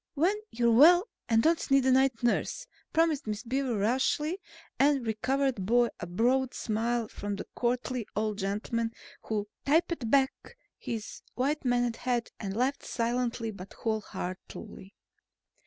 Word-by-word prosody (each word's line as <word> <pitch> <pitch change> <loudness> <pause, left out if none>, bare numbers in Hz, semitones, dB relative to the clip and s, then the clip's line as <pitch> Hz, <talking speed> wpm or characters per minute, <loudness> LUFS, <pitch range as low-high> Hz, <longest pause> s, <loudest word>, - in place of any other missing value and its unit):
"When 345 +8 +3
you're 235 0 +2
well 345 - +7 0.2
and 225 -1 +4
don't 325 +1 +2
need 275 -1 +4
a 260 - +4
night 260 -2 +3
nurse," 240 - 0 0.3
promised 320 -6 +2
Miss 210 +1 -3
Beaver 255 -1 -1
rashly 265 - +1 0.4
and 275 -2 +3
was 220 -1 -1
rewarded 270 -6 +1
by 240 +4 +3
a 175 - -5
broad 250 +8 +1
smile 230 +1 -1
from 205 -1 -5
the - - -6
courtly 245 -1 -1
old 215 -1 -1
gentleman 225 +4 -2 0.3
who 210 -2 -2 0.2
tipped 305 -4 +1
back 265 +1 +1 0.2
his 225 -2 -5
white 285 +4 0
maned 245 -2 +1
head 245 -2 -1
and 195 -1 -4
laughed 265 +3 0
silently 235 -1 -1
but 195 -2 -10
whole 220 -1 -1
heartedly. 190 +1 -8
240 Hz, 145 wpm, -29 LUFS, 220-270 Hz, 0.4 s, well